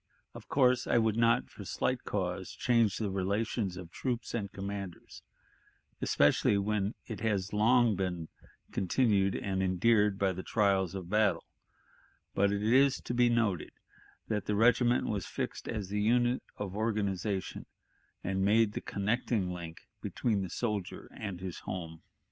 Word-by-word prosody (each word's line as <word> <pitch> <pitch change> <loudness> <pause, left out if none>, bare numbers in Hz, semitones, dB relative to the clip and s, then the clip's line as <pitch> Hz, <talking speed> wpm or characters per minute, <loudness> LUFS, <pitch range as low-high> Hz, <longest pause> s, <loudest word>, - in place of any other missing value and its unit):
Of - - -11
course, 125 -2 +3
I - - +3
would 110 -2 +2
not 115 +1 +3
for 105 - -9
slight 125 +6 -2
cause 95 -2 -2
change 115 -5 +2
the 105 -3 -2
relations 100 0 -1
of 90 -2 -9
troops 120 +1 -3
and 100 -4 -3
commanders, 100 -2 -7 0.8
especially 100 - +3
where 100 +1 0
it 110 -4 -6
has 100 -4 0
been 105 - -3
long 105 -8 +2 0.4
continued 100 -1 +2
and 95 -1 -2
endeared 100 +2 +3
by 100 -1 +2
the 95 - -5
trials 95 -3 +1
of 95 -3 -5
battle; 105 -5 +2 0.9
but 100 +1 +2
it 100 0 -1
is 130 +5 +4
to - - -4
be 120 0 +4
noted 110 -8 0 0.5
that 105 -3 -2
the 105 - +1
regiment 120 +2 +4
was 100 -5 -2
fixed - - -4
as 105 -4 -4
the 105 +1 -1
unit 120 +3 +2 0.2
of 100 -2 -5
organization, 100 -3 -2 0.6
and 95 0 -1
made 110 +2 +4
the - - -4
connecting 100 -1 -1
link 85 -2 -7 0.2
between 110 -5 -1
the 95 - -4
soldier 105 -2 -3
and 100 -4 -6
his 95 -2 -5
home. 80 -3 -6
105 Hz, 150 wpm, -31 LUFS, 95-115 Hz, 0.9 s, is